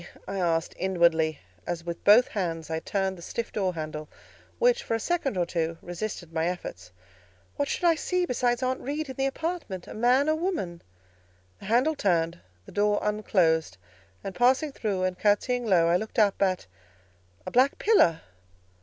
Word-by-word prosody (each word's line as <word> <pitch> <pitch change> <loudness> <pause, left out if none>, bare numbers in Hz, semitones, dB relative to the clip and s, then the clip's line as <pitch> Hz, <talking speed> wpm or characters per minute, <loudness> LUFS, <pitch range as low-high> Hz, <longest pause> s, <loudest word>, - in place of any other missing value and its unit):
I 195 +1 -4
asked 165 -2 0
inwardly, 170 -4 +2 0.3
as 170 -1 -3
with 170 0 -6
both 220 +5 +6
hands 165 -5 -3
I 160 - -1
turned 190 +1 -2
the - - -11
stiff 230 +6 -4
door 190 -4 -1
handle, 155 -1 -5 0.5
which, 485 0 +3
for 225 - -2
a - - -1
second 285 - -1
or 175 - +2
two, 165 -1 -2
resisted 175 -1 -6
my 165 0 0
efforts. 90 - -6 0.6
"What 285 - -1
should - - -3
I 340 -1 +6
see 360 +3 -1
besides 245 -2 0
Aunt 255 +1 0
Reed 290 +2 -3
in 260 - -6
the 270 +1 0
apartment?—a 300 - -4
man 250 +6 +3
or - - +4
a - - +2
woman?" 315 - -3 0.8
The - - -11
handle 245 +9 +3
turned, 170 - 0 0.3
the - - -12
door 205 0 +2
unclosed, 170 - +1 0.5
and 195 - -5
passing 260 +6 +3
through 200 -8 -2
and 185 -1 -1
curtseying 235 +4 +1
low, 175 -5 +4
I 170 +1 +4
looked 220 +5 -7
up 210 -3 +3
at—a 90 - -5
black 260 +3 +3
pillar! 285 - +4
195 Hz, 170 wpm, -27 LUFS, 165-250 Hz, 0.8 s, both